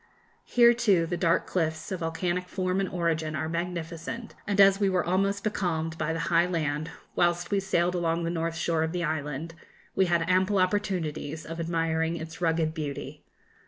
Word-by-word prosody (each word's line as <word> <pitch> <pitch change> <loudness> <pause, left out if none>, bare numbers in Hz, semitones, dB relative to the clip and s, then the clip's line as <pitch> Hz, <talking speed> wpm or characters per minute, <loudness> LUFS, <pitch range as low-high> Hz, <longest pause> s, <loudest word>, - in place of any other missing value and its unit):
Here, 240 -1 +6
too, 205 -8 +3
the 175 - -2
dark 170 -1 +2
cliffs, 160 -2 -2
of 185 - -2
volcanic 175 +2 -2
form 185 +1 -1
and 195 - 0
origin, 160 -3 -1
are 155 +2 -2
magnificent, 170 +5 -4
and 200 -1 0
as 195 0 +7
we 200 -2 +3
were 185 -2 +1
almost 195 +3 +1
becalmed 165 -6 -1
by 155 0 0
the 165 0 -2
high 170 +1 +5
land 155 -3 -1 0.3
whilst 175 0 +1
we 200 - +3
sailed 180 -2 +1
along 170 -1 0
the 165 - -1
north 165 -1 -2
shore 165 -1 0
of 160 +1 -1
the 175 -1 -1
island, 155 0 -3 0.4
we 190 - +3
had 170 -1 +1
ample 185 +3 +3
opportunities 180 -6 -1
of 165 +1 -6
admiring 165 0 0
its 160 +1 -8
rugged 165 -2 +1
beauty. 150 -4 -5
170 Hz, 180 wpm, -28 LUFS, 160-185 Hz, 0.4 s, as